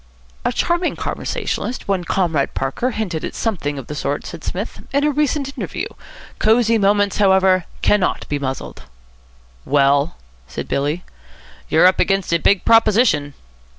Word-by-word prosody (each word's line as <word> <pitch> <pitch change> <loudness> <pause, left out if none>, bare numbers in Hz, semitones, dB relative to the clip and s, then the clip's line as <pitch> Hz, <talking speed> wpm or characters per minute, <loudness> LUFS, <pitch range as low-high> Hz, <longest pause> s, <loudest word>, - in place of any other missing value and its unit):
"A - - +1
charming 345 +1 0
conversationalist, 250 - -3
one 195 -3 0
Comrade 165 -7 0
Parker, 135 - -1
hinted 205 -9 -3
at - - -5
something 160 -10 -2
of 135 - -6
the 150 - -6
sort," 145 0 -3
said 170 -2 -8
Psmith, 200 +6 -5
"in 280 +1 +1
a 300 - +3
recent 285 -1 -1
interview. - - -4 0.5
Cosy 225 +1 +3
Moments, 205 0 +2
however, 190 -2 +4 0.2
cannot 205 -3 +1
be 145 - -2
muzzled." 130 - -5 0.8
"Well?" 140 +2 +2 0.3
said 70 - -6
Billy. 145 +5 -1 0.7
"You're 160 +3 +5
up 185 - +4
against 195 -3 +1
a 170 - +3
big 195 +2 +2
proposition." 215 - +3
190 Hz, 145 wpm, -19 LUFS, 145-225 Hz, 0.8 s, You're